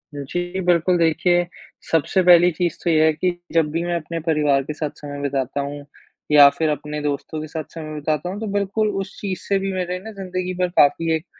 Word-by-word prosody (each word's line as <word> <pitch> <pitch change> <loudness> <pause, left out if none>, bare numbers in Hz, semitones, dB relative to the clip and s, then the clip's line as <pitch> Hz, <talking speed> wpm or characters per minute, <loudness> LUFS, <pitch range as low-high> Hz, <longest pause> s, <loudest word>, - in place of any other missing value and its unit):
जी, 175 +6 -4
बिल्कुल, 175 +1 +3
देखिए, 175 +1 +2 0.5
सबसे 165 +4 +2
पहली 175 0 +7
चीज़ 170 0 -2
तो 170 - +1
ये 155 -1 +4
है 160 - +5
कि 180 +4 0 0.2
जब 160 -2 +3
भी 165 +2 -1
मैं 175 0 -1
अपने 165 0 -4
परिवार 150 -4 +1
के 150 - -5
साथ 150 -1 -3
समय 145 -1 -7
बिताता 140 0 -2
हूँ 145 0 -6 0.5
या 145 -1 +9
फिर 160 -1 +1
अपने 150 0 -3
दोस्तों 150 +2 -3
के 155 - -6
साथ 155 0 -5
समय 155 -2 -7
बिताता 155 +3 -2
हूँ 200 +3 -5
तो 220 - -4
बिल्कुल 205 +2 0
उस - - -8
चीज़ 190 -3 -3
से 195 -1 +2
भी 195 0 -2
मेरे 180 -1 -2
ना 220 - -8
ज़िंदगी 185 -2 -4
पर 180 - +2
काफ़ी 160 +3 +4
एक 160 +3 -5
165 Hz, 215 wpm, -21 LUFS, 150-180 Hz, 0.5 s, या